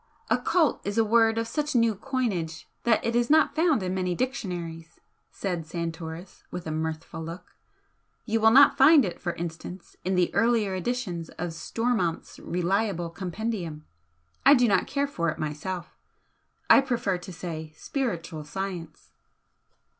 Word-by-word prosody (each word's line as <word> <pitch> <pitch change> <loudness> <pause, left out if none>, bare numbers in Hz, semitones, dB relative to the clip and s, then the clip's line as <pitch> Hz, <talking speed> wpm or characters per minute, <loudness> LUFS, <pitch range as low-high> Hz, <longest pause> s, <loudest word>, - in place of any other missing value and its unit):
"'Occult' 320 -8 +2
is 205 +2 -3
a 225 - +4
word 225 0 +4
of 230 0 -1
such 295 +4 -2
new 230 -2 +4
coinage 205 -9 -3 0.2
that 230 -2 +3
it 230 0 0
is 240 0 +2
not 315 +1 +5
found 315 - +3
in 185 0 -2
many 180 -1 -1
dictionaries," 175 -9 -4 0.3
said 175 -5 -4
Santoris, 165 +1 -6
with 180 -1 -6
a 160 - -3
mirthful 160 +1 -4
look 165 +2 -9 0.7
"You 225 -1 0
will 220 - +7
not 275 +4 +7
find 280 -1 +7
it, 180 - -5
for 175 -1 -2
instance, 170 +2 -7
in 185 +1 0
the 180 -1 +2
earlier 230 -4 +2
editions 185 -4 -3
of 175 +1 -2
Stormonth's 220 -1 -2
reliable 180 -1 -1
compendium. 180 -3 -4 0.6
I 280 - +8
do 245 -2 +4
not 200 - +2
care 280 0 0
for 170 -12 -1
it - - -3
myself; 170 +4 -4 0.7
I - - +8
prefer 235 -8 -1
to 185 +2 -9
say 160 -3 -6
'Spiritual 175 - -3
science.'" 175 0 -6
185 Hz, 150 wpm, -27 LUFS, 170-235 Hz, 0.7 s, I